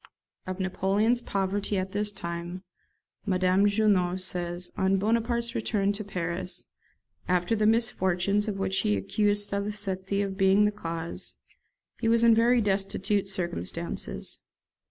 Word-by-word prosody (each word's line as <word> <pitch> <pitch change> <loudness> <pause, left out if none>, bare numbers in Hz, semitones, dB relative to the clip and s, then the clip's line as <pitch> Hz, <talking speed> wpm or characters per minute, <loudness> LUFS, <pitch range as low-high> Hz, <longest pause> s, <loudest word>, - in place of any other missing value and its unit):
[Of 185 0 -4
Napoleon's 200 +5 +1
poverty 200 0 -1
at 190 0 -2
this 205 +1 0
time 175 -1 -5 0.6
Madame 185 0 +3
Junot 200 -4 +2
says, 175 -1 -2
"On 190 +1 +2
Bonaparte's 235 +3 0
return 210 -4 0
to 210 +1 -4
Paris, 180 -1 -4 0.6
after 180 +4 +1
the 215 0 +2
misfortunes 205 -3 +2
of 205 -2 -2
which 190 -1 0
he 105 - +1
accused 205 - +1
Salicetti 200 -1 -2
of 195 -1 -4
being 195 +1 +5
the 210 - +2
cause, 165 -5 -5 0.6
he 225 - 0
was 230 0 +4
in 230 -1 +7
very 235 +2 +4
destitute 195 0 0
circumstances. 170 - -3
195 Hz, 130 wpm, -27 LUFS, 185-210 Hz, 0.6 s, in